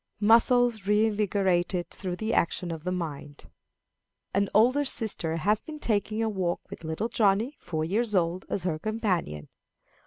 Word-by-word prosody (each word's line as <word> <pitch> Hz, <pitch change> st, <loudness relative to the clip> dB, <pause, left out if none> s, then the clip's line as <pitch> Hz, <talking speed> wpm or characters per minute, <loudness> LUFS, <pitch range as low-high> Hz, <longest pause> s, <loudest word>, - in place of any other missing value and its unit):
Muscles 230 Hz, 0 st, +4 dB
reinvigorated 200 Hz, -4 st, +1 dB
through 185 Hz, -3 st, -5 dB
the 220 Hz, +4 st, -3 dB
Action 170 Hz, +1 st, 0 dB
of 160 Hz, -2 st, -6 dB
the 180 Hz, -, -2 dB
Mind. 150 Hz, -5 st, -6 dB, 0.8 s
An 200 Hz, +1 st, +1 dB
older 250 Hz, +7 st, +4 dB
sister 210 Hz, -, 0 dB
has 205 Hz, +6 st, +1 dB
been 310 Hz, -1 st, -9 dB
taking 215 Hz, -4 st, -1 dB
a -, -, +1 dB
walk, 190 Hz, -5 st, -2 dB
with -, -, -9 dB
little 160 Hz, +8 st, -2 dB
Johnny, 220 Hz, +5 st, +1 dB
four 155 Hz, -2 st, -3 dB
years 210 Hz, +5 st, 0 dB
old, 175 Hz, +1 st, +1 dB
as 190 Hz, -, -2 dB
her 165 Hz, -4 st, -1 dB
companion. 185 Hz, -, -2 dB
200 Hz, 150 wpm, -27 LUFS, 175-220 Hz, 0.8 s, Muscles